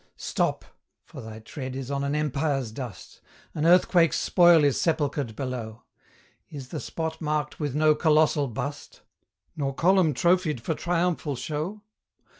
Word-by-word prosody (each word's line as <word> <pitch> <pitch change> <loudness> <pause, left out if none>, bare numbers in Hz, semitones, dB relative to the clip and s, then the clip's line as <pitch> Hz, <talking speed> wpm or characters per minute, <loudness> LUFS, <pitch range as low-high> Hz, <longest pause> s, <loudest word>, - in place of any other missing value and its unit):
Stop! - - -2 0.4
for - - -10
thy 110 -1 -9
tread 130 +3 -7
is 135 0 -5
on 140 0 -1
an 140 +1 -1
empire's 140 -4 -1
dust! 115 -6 -9 0.3
An 155 +1 0
earthquake's 175 -1 +4
spoil 175 -3 +5
is 140 -2 +2
sepulchred 145 -7 -1
below! 120 -4 -5 0.7
Is 135 -4 -9
the 155 - -5
spot 160 +1 -5
marked 150 -1 -2
with 145 -3 -3
no 155 0 +4
colossal 150 -2 +3
bust? 140 +5 -6 0.5
Nor 140 -3 -2
column 175 -3 +3
trophied 170 -3 +2
for 145 +8 -2
triumphal 170 -3 -1
show? 155 - -4
150 Hz, 140 wpm, -26 LUFS, 135-160 Hz, 0.7 s, spoil